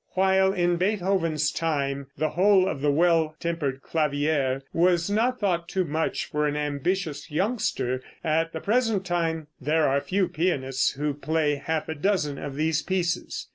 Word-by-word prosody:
While, 190 0 +3
in 175 -2 +1
Beethoven's 180 -5 +1
time, 140 -4 -2
the 155 - 0
whole 190 +2 +4
of 140 - -3
the 145 - +2
"Well 165 0 +2
Tempered 145 -6 -2
Clavier" 145 -3 0
was 175 +1 +2
not 240 +4 +1
thought 175 -4 0
too 190 - 0
much 160 +1 -1
for 150 0 -1
an 145 0 -1
ambitious 150 +2 -2
youngster, 150 - -1 0.2
at 165 +1 +1
the 160 - -6
present 225 -3 +1
time 165 -3 -1
there 155 +3 +2
are 140 +1 +2
few 185 +6 0
pianists 135 -6 0
who 145 +2 -2
play 150 +1 0
half 160 -1 -1
a 160 - -2
dozen 150 -3 0
of 140 -2 -6
these 155 +1 +1
pieces. 180 -2 -2
160 Hz, 160 wpm, -26 LUFS, 145-185 Hz, 0.2 s, whole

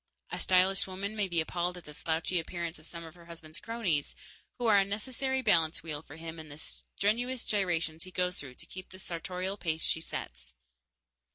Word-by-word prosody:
A - - -2
stylish 190 +1 +5
woman 195 +3 -3
may 205 -2 +2
be 170 -3 +2
appalled 175 +2 -1
at 175 - -10
the 150 - -8
slouchy 165 +3 +1
appearance 170 0 -3
of 155 - -11
some 170 -1 -6
of 160 -1 -9
her 170 -1 -15
husband's 165 -2 -8
cronies, 205 -11 0 0.4
who 245 - -1
are 210 -3 +8
a - - +6
necessary 260 +6 0
balance 170 -7 +4
wheel 155 -3 -2
for 150 - -11
him 165 0 -6
in 155 -1 -8
the 145 - -8
strenuous 235 +9 -1
gyrations 165 -5 +1
he 185 - -6
goes 180 0 +1
through 130 -3 -5
to 160 - -10
keep 185 +2 -8
the 185 - -10
sartorial 185 +2 -2
pace 160 -4 -1
she 160 - +2
sets. 65 - -5
175 Hz, 200 wpm, -32 LUFS, 160-195 Hz, 0.4 s, are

